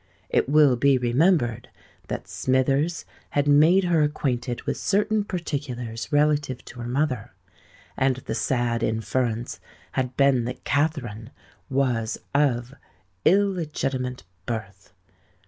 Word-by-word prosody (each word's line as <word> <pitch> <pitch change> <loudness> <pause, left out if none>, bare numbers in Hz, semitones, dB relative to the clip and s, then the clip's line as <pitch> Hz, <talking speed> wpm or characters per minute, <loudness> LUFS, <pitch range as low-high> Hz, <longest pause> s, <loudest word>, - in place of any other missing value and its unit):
It - - +2
will 145 -3 +5
be 140 +1 +4
remembered 120 - +1 0.4
that - - -5
Smithers 135 +6 0 0.2
had 145 0 0
made 155 +7 +5
her 170 -3 +2
acquainted 130 -5 -1
with - - -2
certain 210 +2 +1
particulars 135 - -4
relative 145 -3 +1
to 125 - -11
her 120 - -5
mother; 130 -3 -1 0.6
and 130 -1 +2
the 130 - -6
sad 120 -2 0
inference 115 +1 -1 0.3
had 130 -1 -2
been 135 -4 +3
that 125 +1 -6
Katherine 135 -7 -1 0.4
was 125 -5 0 0.2
of 130 -3 +1 0.5
illegitimate 150 - 0 0.2
birth. 110 -5 -6
130 Hz, 110 wpm, -25 LUFS, 120-150 Hz, 0.6 s, will